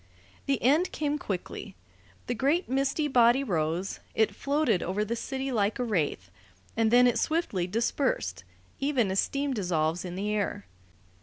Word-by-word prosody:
The 275 -2 +1
end 300 +9 +3
came 295 -1 -1
quickly. 190 -8 -5 0.5
The 245 - -1
great 280 - +1
misty 275 +3 0
body 245 0 +4
rose; 170 - -1 0.2
it 220 - +2
floated 280 - +1
over 200 +4 -1
the 230 +2 -2
city 270 +3 -3
like 210 -3 +1
a 250 - -1
wraith, 150 - -1 0.4
and 225 -1 +2
then 245 +2 +6
it 245 - +3
swiftly 310 - 0
dispersed, 195 - -1 0.4
even 265 -8 +1
as 190 - +1
steam 280 0 0
dissolves 175 -5 0
in 180 -1 -6
the 205 +3 -2
air. 205 - -2
230 Hz, 155 wpm, -28 LUFS, 185-275 Hz, 0.5 s, then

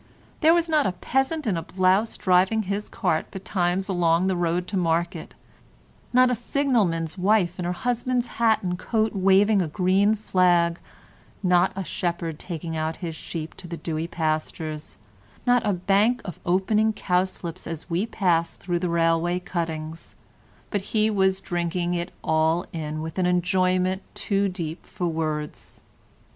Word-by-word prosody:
There 325 +1 +5
was 340 -1 +2
not 310 -6 +2
a 185 - -1
peasant 270 - -1
in 205 -5 +1
a 165 - -2
blouse 185 +5 +1
driving 190 +4 +3
his 200 +2 -3
cart 175 -6 -1
betimes 190 -1 -1
along 175 -2 +2
the 190 -1 +1
road 175 0 0
to 205 - -3
market, 170 -1 -1 0.8
not 255 0 +5
a - - +2
signalman's 215 - 0
wife 185 -2 +2
in 180 - -2
her 175 - 0
husband's 245 +4 -1 0.2
hat 225 -3 +3
and 180 -1 -2
coat 220 +2 0
waving 195 +1 +4
a 175 - -1
green 190 +5 +2
flag, 175 -4 +2 0.6
not 180 0 +4
a 195 - -3
shepherd 170 -3 -3
taking 165 -2 -5
out 160 +1 -2
his 165 -2 -4
sheep 160 0 -6
to 180 - -9
the 170 0 -6
dewy 160 0 -3
pastures, 155 -1 -3 0.5
not 245 -1 +4
a 205 - +1
bank 200 +7 +2
of 180 - -7
opening 210 +5 +2
cowslips 180 -2 -2
as 165 -2 -6
we 175 +5 -1
passed 170 -6 0
through 175 -1 -1
the 180 0 -1
railway 170 +1 +2
cuttings, 165 -3 -5 0.6
but 205 - 0
he 215 +2 +1
was 190 -2 +2
drinking 175 0 -1
it 175 +1 -3
all 160 +2 +2
in 155 -1 -4
with 160 +3 -5
an 180 - +2
enjoyment 185 +1 +1
too 200 -1 0
deep 170 -3 -5
for 180 - -5
words. 155 -2 -3
180 Hz, 155 wpm, -25 LUFS, 170-200 Hz, 0.8 s, There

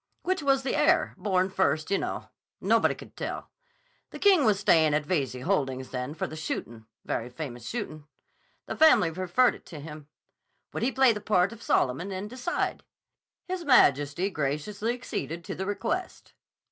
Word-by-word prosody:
Which 370 -2 0
was 270 -1 +2
the 265 - -1
heir—born 200 - +2
first, 185 -3 0
you 200 - +3
know? - - -4 0.3
Nobody - - +3
could - - -13
tell. - - -5 0.6
The - - -9
King 380 -9 +5
was 210 -3 +3
stayin' 160 -7 +4
at 150 -1 0
Veyze 135 -7 -1
Holdings 135 -7 -1
then 125 +3 -4
for - - -2
the 155 - -7
shootin'; 115 -7 -5 0.2
very 120 +1 -2
famous 125 -2 -7
shootin'. 155 -11 -5 0.6
The - - -5
family 315 - +5
referred 185 +8 +2
it - - -13
to 160 - -9
him. 150 0 -9 0.7
Would - - -3
he 245 +4 +1
play 265 -3 +5
the 210 - -6
part 195 -2 +2
of 230 - -13
Solomon 150 - +1
and 190 +2 -4
decide? 255 +7 -2 0.6
His 365 -1 -4
Majesty 170 - +4
graciously 185 - -2
acceded 170 - -5
to - - -5
the 190 +1 -4
request. 340 - -3
185 Hz, 165 wpm, -28 LUFS, 150-240 Hz, 0.7 s, King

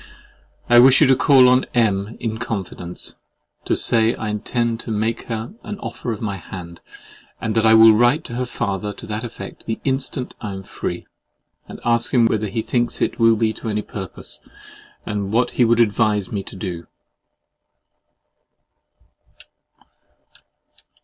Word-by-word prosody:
I 120 0 +7
wish 130 +2 +7
you 155 - +6
to 130 -1 +5
call 130 -1 +6
on 125 +1 +4
M—— 105 -2 +1
in 110 -1 -3
confidence, 95 -6 -5 0.5
to - - +1
say 115 0 +2
I 110 - -4
intend 115 +2 -1
to 120 - -8
make 110 +2 -1
her 115 - -4
an 210 - -6
offer 120 - -5
of 110 0 -5
my 100 -3 -2
hand, 85 -3 -10 0.6
and 115 -1 -2
that 115 0 +3
I 110 - +7
will 110 0 +8
write 120 +8 +3
to - - -8
her 125 +1 -2
father 100 -2 -3
to - - -11
that 105 +2 -4
effect 120 -1 -9
the 110 - -2
instant 135 -1 -2
I 105 -3 -4
am 95 0 -7
free, - - -5 0.6
and - - -10
ask 115 +1 +2
him 120 -2 +5
whether 110 -1 0
he 110 +3 -3
thinks 120 -1 -1
it - - -1
will 115 -1 +5
be 110 0 0
to 115 - -6
any 105 0 -2
purpose, 95 -4 -7 0.7
and 100 -1 -3
what 120 +2 +2
he 125 - +2
would 115 +1 +3
advise 105 -3 +2
me 100 - -2
to - - -10
do. 90 -3 -6
110 Hz, 165 wpm, -21 LUFS, 105-120 Hz, 0.7 s, will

